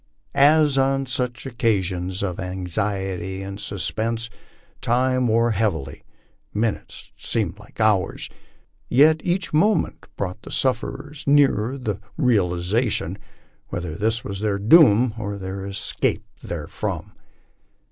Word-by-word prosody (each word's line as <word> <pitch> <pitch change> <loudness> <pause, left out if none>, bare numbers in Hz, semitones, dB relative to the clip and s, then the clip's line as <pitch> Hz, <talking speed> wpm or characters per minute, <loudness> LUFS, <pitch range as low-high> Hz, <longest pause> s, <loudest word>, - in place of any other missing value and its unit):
As 145 0 +5
on 135 0 +2
such 125 0 -2
occasions 95 -7 -1
of 90 -3 -3
anxiety 95 0 -2
and 100 +1 -7
suspense, 110 +4 -2 0.5
time 130 +1 +2
wore 115 +1 +3
heavily, 85 -11 -1 0.5
minutes 110 0 -3
seemed 105 -4 -2
like 105 - -17
hours, 105 -4 +1 0.6
yet 155 +4 +5
each 180 -1 -1
moment 205 +8 +2
brought 90 -2 -4
the - - -11
sufferers 135 +3 -2
nearer 140 -4 +3
the 110 -7 -3 0.2
realization 105 - +1 0.5
whether 85 -3 -4
this 110 +6 0
was 100 -1 -5
their 105 -1 0
doom 115 0 +6
or 100 -2 -4
their 95 0 -5
escape 100 0 -1 0.2
therefrom. - - -4
110 Hz, 110 wpm, -23 LUFS, 95-130 Hz, 0.6 s, doom